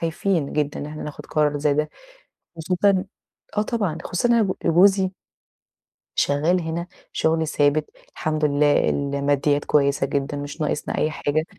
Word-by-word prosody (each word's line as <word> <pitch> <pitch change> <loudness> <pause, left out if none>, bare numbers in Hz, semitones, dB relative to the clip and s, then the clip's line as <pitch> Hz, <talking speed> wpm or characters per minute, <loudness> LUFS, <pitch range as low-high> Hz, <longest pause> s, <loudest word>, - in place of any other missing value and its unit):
خايفين 165 -1 -1
جدًا 150 -1 -2
إحنا 155 0 -7
ناخد 150 - -8
قرار 150 -1 +1
زي 145 -1 +2
ده، 150 +1 0 0.7
خصوصًا 185 +3 +2 0.5
آه - - +4
طبعًا، 205 -9 -2
خصوصًا 180 +7 0
إن 240 - +4
أنا 230 - +4
ب 190 -2 0
جوزي 190 +3 +4 1.1
شغال 160 +6 +2
هنا 165 +2 -4 0.3
شغل 160 0 +1
ثابت 145 0 +1 0.3
الحمد 155 -1 -1
لله، 145 0 +3
الماديات 140 +1 0
كويسة 140 -1 +2
جدًا 140 +1 -2
مش 145 +3 -6
ناقصنا 150 0 -2
أي 155 - +1
حاجة 155 +1 -1
155 Hz, 145 wpm, -23 LUFS, 145-175 Hz, 1.1 s, آه